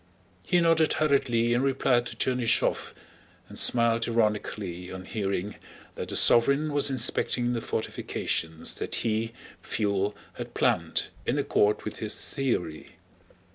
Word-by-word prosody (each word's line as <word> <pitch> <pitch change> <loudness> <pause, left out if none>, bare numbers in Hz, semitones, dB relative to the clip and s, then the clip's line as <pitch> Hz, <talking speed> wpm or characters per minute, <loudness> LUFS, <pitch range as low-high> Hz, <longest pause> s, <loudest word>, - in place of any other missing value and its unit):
He 175 - +1
nodded 165 -2 +3
hurriedly 120 -6 +1
in 120 - +1
reply 135 -2 +2
to 120 - -7
Chernýshev, 125 -2 0 0.5
and - - -7
smiled 115 -1 +4
ironically 105 -5 -2
on 95 0 -8
hearing 100 -1 -3 0.4
that - - -6
the - - -5
sovereign 140 +5 +4
was 145 0 +3
inspecting 125 -1 +2
the 115 - -2
fortifications 80 -7 -3
that - - -3
he, 115 0 -1 0.3
Pfuel, 100 -1 -1 0.2
had - - -8
planned - - 0 0.2
in - - +1
accord 105 +1 +1
with 105 - -6
his 110 -1 -2
theory. 115 - -3
115 Hz, 130 wpm, -27 LUFS, 105-130 Hz, 0.5 s, smiled